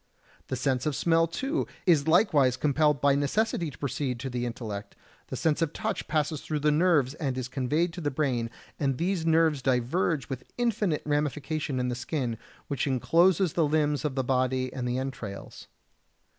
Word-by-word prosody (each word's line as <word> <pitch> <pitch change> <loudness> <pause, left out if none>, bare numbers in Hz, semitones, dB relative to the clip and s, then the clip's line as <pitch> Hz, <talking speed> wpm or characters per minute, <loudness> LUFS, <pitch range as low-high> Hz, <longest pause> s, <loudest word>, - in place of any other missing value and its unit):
The - - -2
sense 130 0 0
of 150 - 0
smell, 165 +2 +3
too, 270 - -2 0.2
is 160 -5 +4
likewise 150 - +4
compelled 150 -1 +2
by 140 0 +5
necessity 170 +5 0
to - - -13
proceed 135 -3 -2
to 135 -1 -4
the 120 0 -2
intellect; 105 -4 -6 0.3
the - - -5
sense 160 0 +1
of 165 -1 0
touch 220 -2 -3
passes 155 -1 0
through 150 -2 -3
the 150 +1 +3
nerves 150 -5 +3
and 140 -5 -3
is 130 -1 -3
conveyed 145 +6 0
to 180 - -6
the 145 - 0
brain, 130 -5 -1 0.3
and 135 -3 0
these 175 0 -1
nerves 160 -3 +3
diverge 130 +4 0
with 130 -2 -7
infinite 215 -9 0
ramification 150 -1 -1
in 125 0 0
the - - -1
skin, 125 -2 -3 0.3
which 140 -1 -1
encloses 165 +7 +3
the 165 -3 +2
limbs 150 -1 +1
of 150 -3 -2
the 130 - 0
body 130 0 0
and 125 -2 -3
the 125 +1 -1
entrails. 125 -7 -6
145 Hz, 180 wpm, -28 LUFS, 130-160 Hz, 0.3 s, by